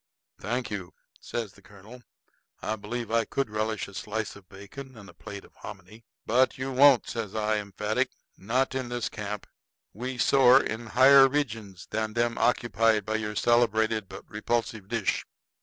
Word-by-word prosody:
"Thank 120 +2 -3
you," 95 -4 -6 0.2
says 115 -5 -5
the 100 - -19
colonel; 105 +5 -14 0.6
"I 110 - -2
believe 110 +3 -5
I 115 0 +3
could 125 +1 -2
relish 110 0 -2
a 100 - -13
slice 105 +2 -4
of 95 -3 -16
bacon 125 +7 -11
and 100 -2 -12
a - - -14
plate 100 -1 -9
of - - -21
hominy." 105 +3 -11 0.2
"But 130 +3 +3
you 130 +1 -3
won't," 135 -1 +6
says 110 -4 -4
I 110 0 +1
emphatic. 105 +1 -1 0.3
"Not 125 +7 0
in 130 -2 -3
this 120 -1 -2
camp. 105 -1 -5 0.5
We 125 +4 -5
soar 130 0 +6
in 110 +1 -4
higher 135 +1 +9
regions 115 - -3
than 110 0 -2
them 120 0 0
occupied 115 -3 +2
by 110 0 0
your 105 -1 -4
celebrated 110 -3 +2
but 95 - -10
repulsive 110 -1 -2
dish." 115 -2 -1
110 Hz, 165 wpm, -27 LUFS, 105-120 Hz, 0.6 s, higher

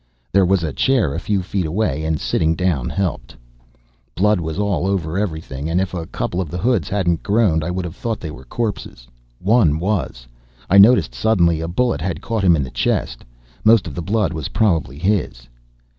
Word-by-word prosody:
There 95 -1 +4
was 95 -2 +2
a 75 -4 -2
chair 125 - +1
a 80 - -2
few 100 0 -1
feet 95 -2 -2
away 80 -4 -1
and 80 -1 -1
sitting 80 0 0
down 80 -8 0
helped. 85 -12 -3 0.8
Blood 105 +1 +2
was 80 0 -4
all 100 -4 0
over 90 -4 -1
everything 80 -7 -3
and 85 +2 +1
if 95 -1 -2
a 85 -2 -4
couple 90 - -3
of 85 - -5
the 90 - -5
hoods 110 -2 0
hadn't 90 -5 0
groaned 100 -7 +2
I 80 - -3
would 90 0 -3
have 85 0 -7
thought 115 -3 -3
they 80 - -6
were 65 -2 -12
corpses. 100 - -4 0.3
One 100 -7 +3
was, 90 - -2 0.5
I 100 - +7
noticed 120 +5 +6
suddenly. 85 -7 +2
A 80 - -3
bullet 85 - 0
had 85 -2 -3
caught 115 -3 -3
him 90 -3 +5
in 75 - 0
the 65 - -7
chest, - - -1 0.4
most 110 -3 +5
of 80 - -6
the 85 - -4
blood 100 +2 0
was 80 -4 -4
probably 80 - 0
his. 90 - -1
90 Hz, 200 wpm, -20 LUFS, 80-100 Hz, 0.8 s, I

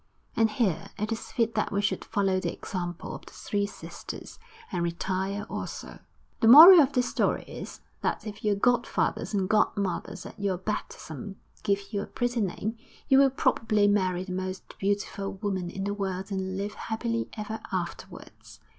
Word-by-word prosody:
And 225 -1 +4
here 215 -6 0
it 210 +2 -2
is 225 - -4
fit 230 -1 +1
that 215 - 0
we 200 - 0
should 205 +1 0
follow 195 -3 +1
the - - -2
example 175 -2 -5
of - - -8
the - - -13
three 205 -1 -2
sisters, - - -9 0.3
and 175 - -1
retire 190 +4 -2
also. - - -6 0.4
The 225 - +3
moral 325 +8 +12
of 280 -1 +2
this 250 -1 +2
story - - +1
is, - - -9 0.2
that - - -1
if 210 -1 -7
your 210 -1 +2
godfathers 240 +3 +1
and 190 -2 +1
godmothers 200 -2 0
at - - -10
your 200 -2 0
baptism 195 -2 -5 0.3
give 200 +1 -1
you 200 - 0
a - - -6
pretty 245 -1 -1
name, 215 +3 -3 0.3
you 270 - +7
will 275 -1 +6
probably 220 -5 +2
marry 185 -3 +2
the 185 - -8
most 185 0 -5
beautiful 200 0 -1
woman 190 -3 -3
in 195 +2 -5
the 205 +1 -1
world 195 -1 -3
and 190 -1 -2
live 205 +1 -3
happily 230 +1 -3
ever 215 +1 -4
afterwards.... - - -6
205 Hz, 175 wpm, -28 LUFS, 190-220 Hz, 0.4 s, moral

